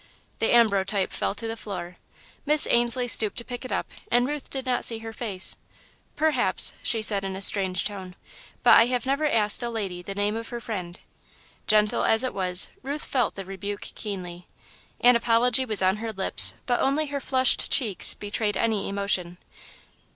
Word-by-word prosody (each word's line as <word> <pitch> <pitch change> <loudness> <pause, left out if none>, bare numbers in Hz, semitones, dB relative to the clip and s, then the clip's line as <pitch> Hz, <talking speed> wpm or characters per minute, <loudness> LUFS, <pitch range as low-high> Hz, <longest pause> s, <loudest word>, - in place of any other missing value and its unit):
The 225 - +1
ambrotype 200 -4 +2
fell - - -3
to 225 - -6
the 225 - -4
floor. 185 -5 -8 0.5
Miss 300 +1 +4
Ainslie 240 +1 +1
stooped 220 -3 +4
to 235 - -2
pick 245 0 -7
it 255 - -7
up - - -3 0.2
and 245 +1 +2
Ruth 295 -1 -6
did 265 -1 -5
not 255 -1 -1
see 230 - +6
her 225 0 -9
face. 200 -6 -1 0.6
"Perhaps," 315 0 +1
she 225 -3 0
said, 200 -2 +3
in 190 -1 -5
a - - -6
strange 190 -3 +2
tone, 190 -3 -7 0.5
"but - - +7
I 230 - +5 0.2
never 280 +3 -1
have 295 - 0
asked 210 0 +4
a 240 - -2
lady 195 -6 -5
the 195 +2 -8
name 205 +1 -1
of 230 0 -6
her 240 - -6
friend." 185 -7 -7 0.7
Gentle 210 -1 +2
as 225 +2 +3
it 255 - -3
was, 185 -2 0
Ruth 285 +3 -4
felt 250 -5 -1
the 195 - -7
rebuke 195 +2 -6
keenly. 180 -4 -7 0.5
An 245 0 +6
apology 235 +2 +2
was 215 -5 +2
on 190 +2 +2
her 225 +1 -5
lips, 195 -3 +2
but 245 -1 0
only 285 +3 +1
her 280 - -3
flushed 260 -1 +1
cheeks 220 -8 +3
betrayed 205 0 -3
any 220 -3 -1
emotion. 195 -3 -2
220 Hz, 185 wpm, -25 LUFS, 195-245 Hz, 0.7 s, but